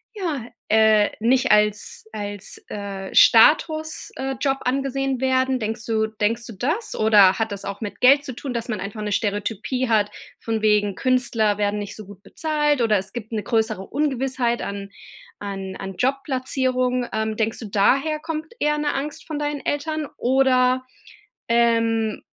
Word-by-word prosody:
ja, 320 - -3 0.2
äh, 220 -1 +4
nicht 250 +4 +2
als 210 - +2
als, 205 -1 -5
äh, 195 -2 -6
Status 315 +6 +4
äh, 270 0 -3
Job 270 -1 +1
angesehen 270 0 -1
werden? 260 0 +1
Denkst 225 +1 -4
du 220 -1 0
denkst 220 +2 -1
du 230 - -8
das? 315 - -2
Oder 205 -3 +5
hat 225 -1 -1
das 200 -1 -5
auch 200 +2 -6
mit 210 -2 -6
Geld 280 +3 +6
zu 260 - -5
tun, 270 +2 -6
dass 235 -1 -3
man 225 -5 -3
einfach 200 +3 -6
'ne 210 0 -3
Stereotypie 210 +5 -1
hat 215 -2 +2 0.3
von 225 -1 -3
wegen 210 -2 +2
Künstler 235 -5 +1
werden 205 0 0
nicht 205 0 -6
so 215 - -9
gut 195 0 -14
bezahlt, 295 +2 0
oder 220 -3 +3
es 190 0 -4
gibt 225 -2 -7
'ne 215 -2 -2
größere 220 -2 -1
Ungewissheit 260 -3 -1
an 200 0 -5 0.5
an 195 -1 -6
an 195 -1 -7
Jobplatzierung. 255 -1 0
Ähm, 220 0 -1
denkst 225 +1 -1
du, 230 - -7
daher 275 +10 +2
kommt 315 +2 -5
eher 300 0 +1
'ne 295 -1 0
Angst 285 +2 -5
von 310 - -4
deinen 295 -1 -3
Eltern, 305 +1 -2
oder 255 0 +3 0.6
ähm 230 -2 +1
235 Hz, 165 wpm, -22 LUFS, 210-270 Hz, 0.6 s, Geld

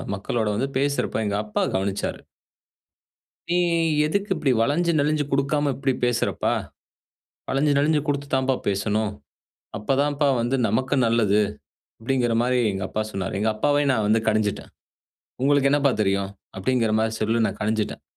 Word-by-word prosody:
மக்களோட 110 +3 -2
வந்து 135 +5 -1
பேசுறப்ப 140 -6 0
எங்க 100 0 -1
அப்பா 105 - -1
கவனிச்சாரு. 95 +1 -2 1.3
"நீ 175 - +2 0.5
எதுக்கு 200 +5 -1
இப்படி 140 -5 +1
வளஞ்சு 170 +7 +1
நெளிஞ்சு 150 +1 +1
கொடுக்காம 140 +1 +1
இப்படி 135 -1 0
பேசுறப்பா! 120 -1 0 1.0
வளஞ்சு 145 +2 +2
நெளிஞ்சு 150 +1 +3
கொடுத்து 140 0 -1
தாம்பா 130 0 +2
பேசணும். 105 +2 0 0.6
அப்பதான் 140 +6 0 0.2
வந்து 120 +3 0
நமக்கு 130 +6 0
நல்லது." 105 -3 +3 0.6
அப்பிடிங்கிறமாரி 120 0 +1
எங்க 95 -1 -4
அப்பா 110 - -2
சொன்னாரு. 95 -2 -4
எங்க 110 +2 +1
அப்பாவ 145 +5 +1
நான் 110 -4 0
வந்து 110 +1 +3
கடிஞ்சுட்டேன். 105 -2 -1 0.7
"உங்களுக்கு 140 0 +3
என்னப்பா 140 -2 +3
தெரியும்?" 100 0 0 0.3
அப்பிடிங்கிற 115 +2 0
மாரி 110 0 0
சொல்லி 115 +1 +1
நான் 100 - -7
கடிஞ்சுட்டேன். 110 0 -2
120 Hz, 130 wpm, -23 LUFS, 110-140 Hz, 1.3 s, நெளிஞ்சு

